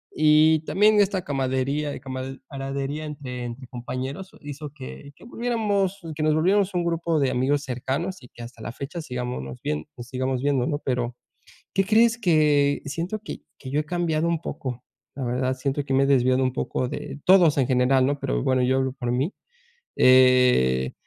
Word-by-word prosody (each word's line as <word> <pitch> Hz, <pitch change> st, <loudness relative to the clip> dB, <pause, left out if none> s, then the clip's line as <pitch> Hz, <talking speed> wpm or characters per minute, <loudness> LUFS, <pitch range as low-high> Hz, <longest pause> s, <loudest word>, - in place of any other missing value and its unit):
y 155 Hz, +1 st, +5 dB
también 210 Hz, +3 st, +4 dB
esta 195 Hz, -2 st, +2 dB
camaradería 135 Hz, +1 st, -1 dB
y -, -, -7 dB
camad 130 Hz, 0 st, -6 dB
camadería 140 Hz, +2 st, -4 dB
entre 135 Hz, -5 st, -6 dB
entre 120 Hz, +2 st, -7 dB
compañeros 130 Hz, +8 st, -6 dB
hizo 145 Hz, 0 st, -7 dB
que 140 Hz, 0 st, -10 dB
que -, -, -19 dB
volviéramos 210 Hz, -5 st, -1 dB
que 155 Hz, -, -4 dB
nos 155 Hz, 0 st, +3 dB
volviéramos 195 Hz, +4 st, +2 dB
un 175 Hz, -1 st, 0 dB
grupo 165 Hz, -1 st, 0 dB
de 135 Hz, -2 st, +2 dB
amigos 140 Hz, +3 st, +1 dB
cercanos, 140 Hz, +8 st, -3 dB
y 125 Hz, -, -13 dB
que 120 Hz, -, -11 dB
hasta 115 Hz, -1 st, -11 dB
la 115 Hz, -, -5 dB
fecha 140 Hz, +7 st, -6 dB
sigámonos 125 Hz, -, -5 dB
vien 75 Hz, 0 st, -2 dB
sigamos 130 Hz, +1 st, -2 dB
viendo, 140 Hz, -3 st, +1 dB
¿no?, 145 Hz, -2 st, -1 dB
pero, 125 Hz, -2 st, -1 dB, 0.6 s
¿qué 195 Hz, -, +3 dB
crees?, 225 Hz, +3 st, +4 dB
que 150 Hz, -7 st, +3 dB
siento 170 Hz, +9 st, -3 dB
que 215 Hz, -, -8 dB, 0.2 s
que 130 Hz, -, -8 dB
yo 145 Hz, +2 st, +1 dB
he -, -, -4 dB
cambiado 170 Hz, -1 st, 0 dB
un 170 Hz, -2 st, 0 dB
poco, 125 Hz, -2 st, -5 dB, 0.3 s
la 135 Hz, -, -3 dB
verdad, 130 Hz, +2 st, 0 dB
siento 140 Hz, +2 st, -2 dB
que 135 Hz, -, -2 dB
me 135 Hz, -, +4 dB
he -, -, +2 dB
desviado 130 Hz, -1 st, +3 dB
un 130 Hz, -1 st, +1 dB
poco 130 Hz, 0 st, -2 dB
de 145 Hz, +1 st, -6 dB
todos 180 Hz, -5 st, +6 dB
en 135 Hz, -, +3 dB
general, 130 Hz, +1 st, +3 dB
¿no?, 145 Hz, +1 st, 0 dB
pero -, -, -1 dB
bueno, 130 Hz, -1 st, +2 dB
yo 130 Hz, +1 st, +2 dB
hablo 130 Hz, -1 st, 0 dB
por 125 Hz, -2 st, -4 dB
mí, 135 Hz, +10 st, 0 dB, 0.6 s
eh, 125 Hz, -, +5 dB
140 Hz, 185 wpm, -24 LUFS, 130-160 Hz, 0.6 s, todos